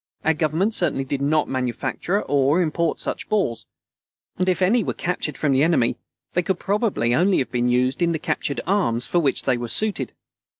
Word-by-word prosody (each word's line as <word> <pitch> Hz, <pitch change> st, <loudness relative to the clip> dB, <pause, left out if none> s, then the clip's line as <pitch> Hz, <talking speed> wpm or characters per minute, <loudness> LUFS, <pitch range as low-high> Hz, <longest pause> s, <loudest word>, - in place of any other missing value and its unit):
Our 160 Hz, -, +4 dB
Government 160 Hz, +7 st, 0 dB
certainly 155 Hz, -9 st, 0 dB
did 135 Hz, +1 st, -3 dB
not 150 Hz, +2 st, +2 dB
manufacture 130 Hz, -, -2 dB
or 140 Hz, +3 st, +2 dB
import 170 Hz, -1 st, 0 dB
such -, -, -4 dB
balls, 190 Hz, -, -1 dB, 0.7 s
and 185 Hz, 0 st, +2 dB
if 180 Hz, -, +1 dB
any 220 Hz, +5 st, +3 dB
were -, -, -3 dB
captured 170 Hz, -4 st, -3 dB
from 150 Hz, -, +1 dB
the 135 Hz, 0 st, +3 dB
enemy, 150 Hz, -7 st, +2 dB, 0.4 s
they 180 Hz, -, +2 dB
could 180 Hz, +1 st, -1 dB
probably 195 Hz, -, 0 dB
only 180 Hz, +8 st, +3 dB
have 130 Hz, -, -1 dB
been 125 Hz, -1 st, 0 dB
used 125 Hz, +4 st, +1 dB
in 170 Hz, -1 st, +3 dB
the 165 Hz, -, 0 dB
captured 155 Hz, -3 st, -2 dB
arms 150 Hz, -, +1 dB
for 175 Hz, -, +1 dB
which 145 Hz, -5 st, +1 dB
they 125 Hz, -2 st, +1 dB
were 120 Hz, -, -4 dB
suited. 215 Hz, -, 0 dB
155 Hz, 195 wpm, -22 LUFS, 130-180 Hz, 0.7 s, Our